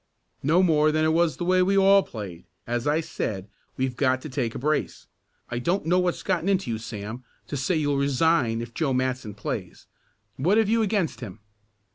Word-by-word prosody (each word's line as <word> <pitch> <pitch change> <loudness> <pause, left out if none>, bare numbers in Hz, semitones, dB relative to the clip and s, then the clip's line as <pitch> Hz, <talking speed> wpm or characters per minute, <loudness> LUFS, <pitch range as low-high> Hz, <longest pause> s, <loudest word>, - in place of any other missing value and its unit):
"No 165 +7 +3
more 155 -3 +4
than 155 +1 +1
it 160 - +2
was 165 -4 +2
the 175 - -3
way 185 +1 +3
we 195 +2 +2
all 195 0 +6
played. 100 - -8 0.2
As 120 +2 -2
I 150 +2 +2
said, 100 - -4 0.3
we've 130 -1 -1
got 130 -1 +2
to 155 - -6
take 125 -4 -2
a - - -2
brace. 150 +3 -1 0.5
I 120 - -1
don't 175 +10 0
know 180 +3 +3
what's 180 -1 -1
gotten 185 0 0
into 190 -10 +1
you, 110 - -2
Sam, 110 +2 -7 0.2
to - - -5
say 135 +6 0
you'll 145 -3 +1
resign 140 -4 +2
if 120 0 -10
Joe 140 -2 0
Matson 130 -4 -2
plays. 105 - -5 0.5
What 180 +11 +2
have 220 -2 +3
you 230 +1 +3
against 190 - 0
him?" 110 -4 -8
145 Hz, 200 wpm, -25 LUFS, 120-175 Hz, 0.5 s, all